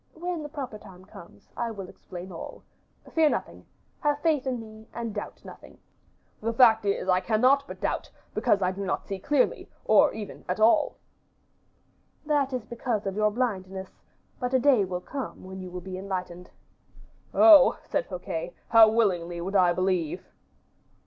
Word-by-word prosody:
"When 345 0 -4
the 295 - -7
proper 265 -8 -6
time 185 -2 -14
comes, 175 -3 -15
I 235 - -2
will 200 -4 -7
explain 185 0 -10
all. 165 - -9 0.5
Fear 320 -2 +4
nothing. - - -4 0.3
Have 295 -1 +1
faith 300 -5 +1
in 250 -2 -1
me, 220 0 -12
and 230 -2 -4
doubt 205 - -7
nothing." - - -13 0.6
"The 225 +2 -1
fact 225 -3 +5
is, 200 -2 -1
I 185 -1 +4
cannot 250 +8 +3
but - - -9
doubt, - - -2 0.2
because 200 -2 +2
I 180 - +2
do 195 +1 -5
not 195 - -2
see 195 -1 -5
clearly, 280 +6 0 0.2
or - - +5
even 215 -2 -8
at 180 - -1
all." 235 +8 +3 1.3
"That 290 -3 +1
is 250 -4 -4
because 235 -2 -3
of 195 -1 -3
your 210 0 +3
blindness; 195 -5 -4 0.4
but 250 0 -1
a - - +5
day 255 -6 +4
will 180 -1 -4
come 270 +7 -6
when 190 0 -8
you 185 - -7
will 180 0 -7
be 185 0 -7
enlightened." 180 -2 -5 0.8
"Oh!" 310 -5 +7
said - - -2
Fouquet, - - -5
"how 225 -1 +8
willingly 180 -6 0
would 190 +4 -4
I 180 -2 +5
believe." 180 -3 -1
215 Hz, 170 wpm, -27 LUFS, 185-255 Hz, 1.3 s, how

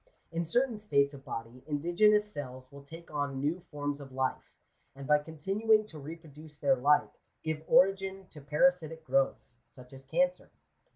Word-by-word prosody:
In 170 0 -2
certain 240 +5 +1
states 140 -8 +2
of 135 -1 -11
body, 115 +1 -7
indigenous 210 +8 +3
cells 130 -4 -7
will 140 0 -11
take 165 +4 -12
on 145 -2 -2
new 150 +6 0
forms 145 -1 -3
of 135 -1 -10
life, 130 0 -2 0.5
and 140 0 -8
by 150 +1 +4
continuing 195 +9 +1
to 160 -7 -10
reproduce 155 0 -11
their 140 -2 +3
like, 145 +4 +2 0.2
give 155 -1 -2
origin 195 0 +3
to 150 - -12
para 150 +5 +4
sitic 160 -2 -10
growths, 135 -4 0
such 125 0 -15
as 135 0 -11
cancer. 270 - 0
150 Hz, 165 wpm, -31 LUFS, 140-180 Hz, 0.5 s, by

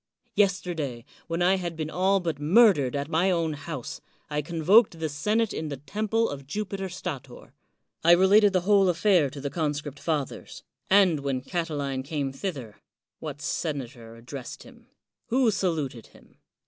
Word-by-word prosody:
Yes 195 -2 +3
terday, 145 -11 -5 0.2
when 165 +1 -1
I 190 +2 +4
had 175 -2 -4
been 155 -1 -4
all 190 +2 +2
but 165 -5 -3
murdered 155 - +4
at 140 0 -2
my 165 +4 +2
own 165 -3 0
house, 145 -3 -7 0.3
I 150 0 0
convoked 170 - +3
the 160 -1 -2
senate 210 +10 0
in 155 -1 -4
the 140 - -5
temple 215 - -1
of 140 -1 -7
Jupiter 195 +2 -4
Stator; 140 -8 -7 0.5
I 170 +1 +7
related 200 +3 +5
the 185 -1 +1
whole 195 0 +4
affair 175 -3 +3
to 140 +2 -9
the 140 0 -4
conscript 145 -2 -3
fathers; 150 -5 -4 0.3
and 190 -5 +5
when 135 -2 -2
Catiline 145 -4 -3
came 140 -1 -3
thither, 135 - -6 0.4
what 150 -2 -7
senator 130 -7 -4
addressed 125 +3 -9
him? 240 -2 -17 0.4
who 245 -1 +3
saluted 160 - -2
him - - -22
160 Hz, 160 wpm, -26 LUFS, 140-190 Hz, 0.5 s, I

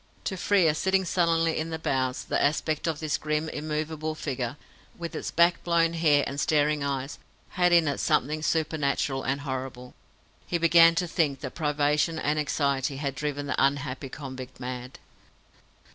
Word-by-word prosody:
To 190 - -2
Frere, 180 -4 +3
sitting 190 +4 +1
sullenly 165 -2 +2
in 160 +1 -3
the 160 - -3
bows, 130 -4 -1
the - - 0
aspect 155 +2 0
of 160 -2 -1
this 155 -2 -1
grim 155 +1 -1
immovable 155 +1 -3
figure, 130 -3 -4 0.4
with 170 -1 -6
its - - -4
back 170 +1 +3
blown 170 -1 +2
hair 150 -4 +3
and 140 - -4
staring 150 -1 +2
eyes, 140 0 -3 0.3
had 180 -1 +2
in 170 -2 +5
it 145 - -1
something 150 +4 +1
supernatural 150 -4 0
and 135 +2 -2
horrible. 130 -2 -5 0.5
He 175 - 0
began 165 0 +6
to 180 - +1
think 145 -5 0
that - - -6
privation 150 +1 +1
and 150 0 0
anxiety 140 -1 0
had 140 -1 -2
driven 145 0 -3
the 140 - 0
unhappy 140 -1 -1
convict 130 -2 -8
mad. 125 0 -6
150 Hz, 160 wpm, -27 LUFS, 140-165 Hz, 0.5 s, began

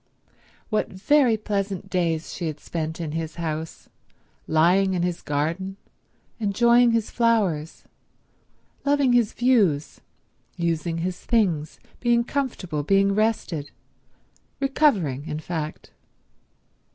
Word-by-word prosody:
What 215 - +1
very 240 +4 +3
pleasant 200 -3 -3
days 165 -3 -1
she 175 - -3
had 155 -2 -5
spent 160 -1 -4
in 160 -3 -3
his 160 0 -4
house, 160 -1 -5 0.6
lying 180 +4 +3
in 175 - 0
his 175 -1 -2
garden, 165 +7 -2 0.6
enjoying 235 +3 +4
his 230 -2 0
flowers, 200 -10 +1 1.0
loving 280 -3 +3
his 235 -3 +3
views, 205 - +1 0.6
using 170 -1 -1
his 180 -1 -3
things, 175 -10 0 0.2
being 235 -1 +3
comfortable, 235 - -2
being 195 +5 +3
rested—recovering, 205 - -2
in 150 - -3
fact. 155 -2 -5
185 Hz, 105 wpm, -24 LUFS, 160-230 Hz, 1.0 s, enjoying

